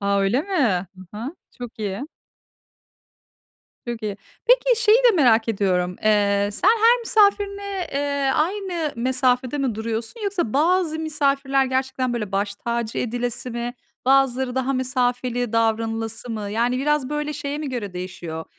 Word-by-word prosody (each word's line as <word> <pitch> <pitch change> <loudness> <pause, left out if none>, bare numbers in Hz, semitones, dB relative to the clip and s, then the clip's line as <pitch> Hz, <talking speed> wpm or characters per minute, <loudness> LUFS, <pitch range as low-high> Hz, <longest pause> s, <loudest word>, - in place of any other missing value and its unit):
A, 200 0 +1
öyle 225 +9 +2
mi? 245 - +1 0.2
Hı 195 +4 -14
hı. 270 +9 -5 0.2
Çok 245 -2 -8
iyi. 210 +7 -4 1.8
Çok 235 -1 -4
iyi. 205 -2 -3 0.3
Peki - - +4
şeyi 430 +1 +6
de - - +5
merak 235 -7 +4
ediyorum: 180 -4 0
Eee, 205 -1 +3
sen 375 - +2
her 460 +2 +5
misafirine, 400 -4 +1
eee, 280 -1 0
aynı 345 -2 -1
mesafede 255 +2 +1
mi 265 -6 0
duruyorsun 225 - -4
yoksa 370 - -1
bazı 320 +2 +2
misafirler 275 -3 +1
gerçekten, 260 -1 -1
böyle, 210 -5 -3
baş 200 +1 -1
tacı 235 +1 -3
edilesi 245 +1 -3
mi? 240 +1 -4 0.3
Bazıları 265 -1 +3
daha 260 +1 0
mesafeli 250 -2 -1
davranılası 225 +1 -1
mı? 210 -2 -4
Yani 240 +4 +1
biraz, 295 -1 +1
böyle, 300 0 -2
şeye 290 0 -4
mi 300 -2 -4
göre 230 -7 -4
değişiyor? 180 -3 -6
255 Hz, 140 wpm, -22 LUFS, 220-300 Hz, 1.8 s, şeyi